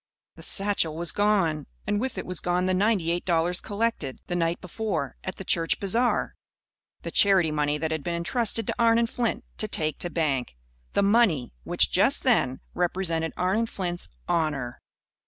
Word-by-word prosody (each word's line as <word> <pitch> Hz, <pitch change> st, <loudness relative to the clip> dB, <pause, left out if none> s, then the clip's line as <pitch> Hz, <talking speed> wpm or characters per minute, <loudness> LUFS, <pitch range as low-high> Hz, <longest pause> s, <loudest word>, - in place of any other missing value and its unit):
The -, -, -14 dB
satchel 195 Hz, -6 st, +1 dB
was 170 Hz, -1 st, +2 dB
gone. 190 Hz, -8 st, +1 dB, 0.2 s
And 205 Hz, 0 st, 0 dB
with 260 Hz, +1 st, -3 dB
it -, -, -4 dB
was 180 Hz, -2 st, -2 dB
gone 180 Hz, +1 st, 0 dB
the 185 Hz, -, +1 dB
ninety 190 Hz, -3 st, +1 dB
eight 175 Hz, +1 st, -1 dB
dollars 175 Hz, 0 st, +1 dB
collected, 205 Hz, -, -2 dB
the 175 Hz, -, -3 dB
night 170 Hz, 0 st, 0 dB
before, 180 Hz, -, -3 dB
at 190 Hz, -, -4 dB
the -, -, -7 dB
church 165 Hz, -2 st, +2 dB
bazaar 230 Hz, +5 st, +1 dB, 0.7 s
the -, -, -5 dB
charity 190 Hz, -6 st, +4 dB
money 150 Hz, 0 st, 0 dB
that 160 Hz, +1 st, -2 dB
had 160 Hz, -2 st, -2 dB
been 170 Hz, -1 st, -2 dB
entrusted 225 Hz, +5 st, +1 dB
to -, -, -2 dB
Arnon 230 Hz, 0 st, +4 dB
Flint 235 Hz, -1 st, -2 dB
to 215 Hz, -, 0 dB
take 155 Hz, -6 st, -1 dB
to 175 Hz, -, -1 dB
bank 140 Hz, -, -1 dB, 0.4 s
the -, -, +2 dB
money 200 Hz, -, +2 dB
which, -, -, +2 dB
just -, -, +2 dB
then, 130 Hz, +1 st, +2 dB
represented 170 Hz, -2 st, -1 dB
Arnon 195 Hz, +6 st, +1 dB
Flint's 175 Hz, -4 st, -2 dB, 0.2 s
honour. 155 Hz, -8 st, -1 dB
175 Hz, 175 wpm, -26 LUFS, 160-205 Hz, 0.7 s, charity